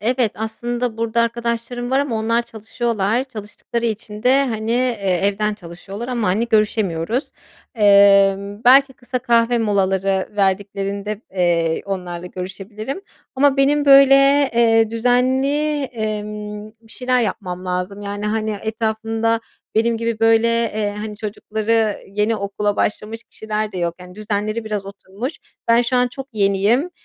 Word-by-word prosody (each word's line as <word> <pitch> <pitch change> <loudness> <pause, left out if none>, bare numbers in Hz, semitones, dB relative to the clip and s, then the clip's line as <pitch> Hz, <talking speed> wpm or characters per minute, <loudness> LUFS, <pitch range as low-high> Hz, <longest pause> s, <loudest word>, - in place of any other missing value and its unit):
Evet, 240 0 +1
aslında 240 +2 -3
burada 230 0 0
arkadaşlarım 235 +1 -3
var 265 - +3
ama 275 -5 -1
onlar 230 +2 +1
çalışıyorlar, 230 0 -2
çalıştıkları 235 0 -5
için 215 -1 -5
de 265 +3 +4
hani, 220 -2 -3
eee, 225 -8 0
evden 210 +1 0
çalışıyorlar 195 +4 -9
ama 240 -3 -1
hani, 220 +6 0
görüşemiyoruz. 215 - 0 0.4
Emm, 200 -1 +4
belki 270 +2 +6
kısa 250 0 -4
kahve 235 -1 +2
molaları 195 -3 +1
verdiklerinde, 200 +1 -1
eee, 170 -3 +1
onlarla 180 -3 -5
görüşebilirim 205 - -6 0.3
ama 275 +1 +3
benim 285 +2 +3
böyle, 275 -1 +8 0.4
eee, 225 -1 +4
düzenli, 260 +5 +1
emm, 210 -3 -5
bir 225 -1 -13
şeyler 250 -1 +1
yapmam 185 -3 -4
lazım 180 +2 -3
yani 205 +1 -4
hani, 215 -1 -1
etrafımda 225 +1 -1 0.3
benim 230 +1 +2
gibi 230 0 -2
böyle, 225 0 +4
eee, 220 -3 -1
hani, 210 0 -6
çocukları 215 0 -1
yeni 210 +3 0
okula 205 0 -2
başlamış 220 +2 -2
kişiler 215 -1 -4
de 185 - -5
yok 170 -1 -1
yani, 180 0 -12
düzenleri 215 +2 -3
biraz 210 -2 -4
oturmuş. 200 - -6 0.4
Ben 230 +1 +5
şu 245 +1 0
an 250 0 +3
çok 270 +2 -8
yeniyim 210 - +2
220 Hz, 135 wpm, -20 LUFS, 200-235 Hz, 0.4 s, böyle